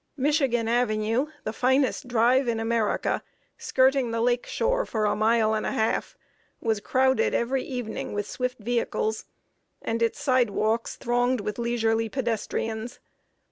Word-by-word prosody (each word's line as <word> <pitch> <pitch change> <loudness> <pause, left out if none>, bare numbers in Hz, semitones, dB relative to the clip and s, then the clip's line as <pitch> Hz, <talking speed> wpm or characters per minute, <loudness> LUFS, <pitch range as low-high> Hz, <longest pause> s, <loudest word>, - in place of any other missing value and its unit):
Michigan 270 -5 +1
Avenue, 230 +2 +1 0.2
the 215 - -3
finest 260 +2 +1
drive 245 +2 +3
in 230 -1 0
America, 225 -1 0 0.4
skirting 265 -1 +2
the 230 0 -2
lake 240 +1 +1
shore - - 0
for 220 - -1
a 210 - +1
mile 220 0 +3
and 215 - -1
a - - -2
half, 220 0 -1 0.4
was 220 -2 0
crowded 260 +4 +2
every 255 +3 0
evening 245 -4 -5
with 205 0 -2
swift 250 0 -3
vehicles, 220 -1 -1 0.5
and 230 +1 -3
its 230 - +1
sidewalks 230 -3 +1
thronged 245 0 0
with 210 +3 -4
leisurely 225 -1 0
pedestrians. 225 -1 -3
235 Hz, 140 wpm, -26 LUFS, 220-255 Hz, 0.5 s, drive